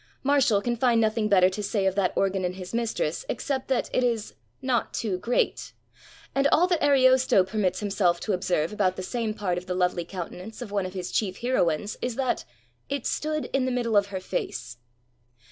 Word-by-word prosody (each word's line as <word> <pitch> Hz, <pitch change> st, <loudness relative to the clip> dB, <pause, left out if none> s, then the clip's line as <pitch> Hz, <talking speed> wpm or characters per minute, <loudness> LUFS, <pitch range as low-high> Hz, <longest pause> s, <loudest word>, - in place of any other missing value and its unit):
Martial 265 Hz, -7 st, +3 dB
can 240 Hz, 0 st, 0 dB
find 235 Hz, -1 st, +3 dB
no 220 Hz, -1 st, +3 dB
thing 215 Hz, -1 st, 0 dB
better 185 Hz, -3 st, +6 dB
to 210 Hz, -, -4 dB
say 200 Hz, -1 st, -1 dB
of 190 Hz, -, +2 dB
that 190 Hz, -2 st, +1 dB
organ 195 Hz, -1 st, +1 dB
in 180 Hz, 0 st, -1 dB
his 185 Hz, +1 st, -8 dB
mistress 235 Hz, -, -1 dB
except 270 Hz, -2 st, -2 dB
that 260 Hz, -2 st, 0 dB
it 255 Hz, -, +2 dB
is 230 Hz, -3 st, -1 dB, 0.3 s
''not 255 Hz, -3 st, 0 dB
too 195 Hz, -5 st, -2 dB
great," 240 Hz, +6 st, -1 dB, 0.6 s
and 275 Hz, +1 st, +3 dB
all 335 Hz, +4 st, +4 dB
that 350 Hz, -3 st, 0 dB
Ariosto 260 Hz, -7 st, +5 dB
permits 190 Hz, -1 st, -1 dB
himself 195 Hz, -4 st, +1 dB
to 210 Hz, -, -1 dB
observe 180 Hz, -2 st, 0 dB
about 190 Hz, -3 st, +1 dB
the 185 Hz, -, -5 dB
same 220 Hz, +2 st, -2 dB
part 185 Hz, -5 st, -1 dB
of 180 Hz, -, -16 dB
the 180 Hz, -, -2 dB
lovely 180 Hz, -1 st, +1 dB
countenance 185 Hz, +4 st, -7 dB
of 240 Hz, -5 st, -7 dB
one 200 Hz, -2 st, 0 dB
of 185 Hz, -, -10 dB
his 180 Hz, -1 st, -4 dB
chief 195 Hz, -2 st, -1 dB
heroines 205 Hz, -6 st, 0 dB
is 245 Hz, -2 st, -2 dB
that 260 Hz, -1 st, -1 dB, 0.4 s
"it 280 Hz, -3 st, -3 dB
stood 305 Hz, 0 st, -1 dB
in 270 Hz, -1 st, +2 dB
the 260 Hz, -, 0 dB
middle 240 Hz, -3 st, 0 dB
of 200 Hz, -1 st, +4 dB
her 195 Hz, -2 st, -4 dB
face." 120 Hz, -8 st, -4 dB
210 Hz, 205 wpm, -26 LUFS, 185-250 Hz, 0.6 s, better